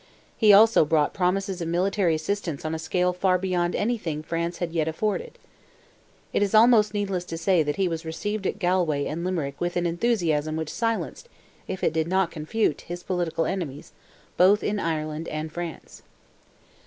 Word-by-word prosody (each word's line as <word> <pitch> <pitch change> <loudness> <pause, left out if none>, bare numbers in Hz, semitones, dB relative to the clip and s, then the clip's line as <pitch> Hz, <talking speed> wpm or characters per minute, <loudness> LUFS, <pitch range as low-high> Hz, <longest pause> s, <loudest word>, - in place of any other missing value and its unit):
He 215 -2 +5
also 220 -1 +7
brought 150 -1 +1
promises 190 0 -1
of 165 - -2
military 180 0 +1
assistance 165 -2 -3
on 155 - -2
a 160 - -3
scale 180 +2 0
far 185 0 +2
beyond 180 -1 -1
anything 205 -9 -2
France 170 +2 -3
had 175 -2 -3
yet 160 -2 0
afforded. 215 - -2 1.0
It - - +1
is 205 +1 +1
almost 215 -2 +5
needless 195 -3 -1
to 165 - -5
say 170 +1 +2
he 155 +6 0
was 165 -1 -3
received 200 +5 -3
at - - -2
Galway 175 -7 +1
and 165 +3 -4
Limerick 160 -7 -3
with 175 0 -1
an 175 - 0
enthusiasm 170 -5 0
which 160 -1 -4
silenced, 230 - -2 0.4
if 190 - -5
it - - +2
did 160 0 0
not 185 -1 +1
confute, 155 +1 -1
his 175 +1 -7
political 175 -3 -1
enemies, 160 -7 -4 0.5
both 195 +4 +5
in 205 0 -1
Ireland 155 -2 -3
and 155 +1 -4
France. 170 -1 -7
175 Hz, 170 wpm, -25 LUFS, 160-195 Hz, 1.0 s, also